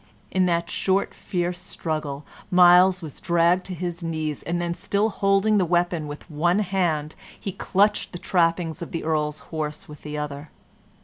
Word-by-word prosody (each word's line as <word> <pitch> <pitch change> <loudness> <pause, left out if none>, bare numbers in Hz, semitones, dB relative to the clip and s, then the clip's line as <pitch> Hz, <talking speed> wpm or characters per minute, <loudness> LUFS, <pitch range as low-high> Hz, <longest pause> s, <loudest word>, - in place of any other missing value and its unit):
In 185 -1 +2
that 170 -1 +1
short, 195 +1 0
fierce 175 -2 -3
struggle 150 -3 -4 0.2
Myles 180 0 +6
was 155 -4 -8
dragged 175 +1 +2
to 185 - -5
his 175 0 -4
knees, 155 -3 -3
and 170 +1 -2
then, 170 0 -1
still 205 +5 0
holding 200 +2 +3
the - - +3
weapon 175 -2 +1
with 145 0 -8
one 175 +3 +1
hand, 175 -7 0 0.3
he 195 - -4
clutched 205 +3 +1
the 175 - -6
trappings 165 -2 +1
of 170 - -7
the 165 - -3
Earl's 150 -1 -1
horse 150 -1 -3
with 150 -1 -12
the 150 0 -6
other. 150 0 -5
170 Hz, 170 wpm, -24 LUFS, 155-185 Hz, 0.3 s, Myles